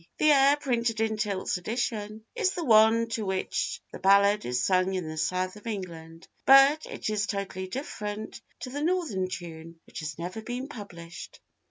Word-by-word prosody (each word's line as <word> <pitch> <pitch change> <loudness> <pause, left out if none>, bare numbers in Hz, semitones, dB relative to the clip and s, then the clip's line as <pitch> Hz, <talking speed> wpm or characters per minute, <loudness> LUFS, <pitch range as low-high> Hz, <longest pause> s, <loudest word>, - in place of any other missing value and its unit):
The 305 - +5
air 280 0 +6
printed 235 -5 -1
in 220 0 +1
Tilt's 200 -3 -1
edition 215 +1 -3
is 425 -6 0
the 345 - -3
one 225 -2 +5
to 225 -1 -2
which 190 -1 -2
the - - -8
ballad 200 +2 +4
is 125 0 -1
sung 185 0 +2
in 180 -3 -3
the 155 - -5
South 185 +5 -1
of 210 - -12
England, 165 -6 -7 0.2
but 275 +3 +6
it - - -5
is 210 -1 0
totally 190 -1 -4
different 210 -2 -5 0.2
to 255 - -6
the 290 +2 -4
Northern 310 - 0
tune, 165 -2 -8
which - - -9
has 155 -2 -5
never 180 +6 -5
been 245 +4 -5
published. 175 -9 -10
210 Hz, 175 wpm, -28 LUFS, 185-240 Hz, 0.2 s, air